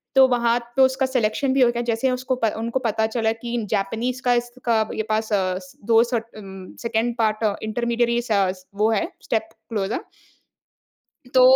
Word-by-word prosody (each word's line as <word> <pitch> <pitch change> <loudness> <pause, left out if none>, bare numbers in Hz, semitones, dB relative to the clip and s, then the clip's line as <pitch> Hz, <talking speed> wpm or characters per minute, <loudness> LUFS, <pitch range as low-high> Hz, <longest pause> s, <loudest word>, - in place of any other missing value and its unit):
तो 265 -1 +8
वहाँ 240 -1 +2 0.2
पे 270 - +4
उसका 260 0 +4
सिलेक्शन 260 +1 0
भी 270 - +3
हो 245 - +6
गया, 240 0 -2
जैसे 235 +2 0
उसको 255 +1 -1 0.2
उनको 235 +3 -1
पता 220 0 +1
चला 220 -1 0
कि 235 +1 -4
जैपनीज़ 225 +5 -1
का 245 - +4
इसका 240 -1 0 0.2
ये 220 - -1
पास 220 0 0
अस 185 -2 -1
2 225 0 +5
सर्ट 235 -2 -2
उम, 190 -2 -10
2nd 230 0 0
पार्ट 220 -1 +1 0.2
इंटरमीडियरी 235 +2 0
सा 200 -5 +1
स 185 0 -13
वो 215 +2 +2
है, 220 - +1 0.2
स्टेप 220 -1 -1 0.2
क्लोज़र। 210 -2 -2 1.3
तो 255 - +6
230 Hz, 170 wpm, -23 LUFS, 215-245 Hz, 1.3 s, तो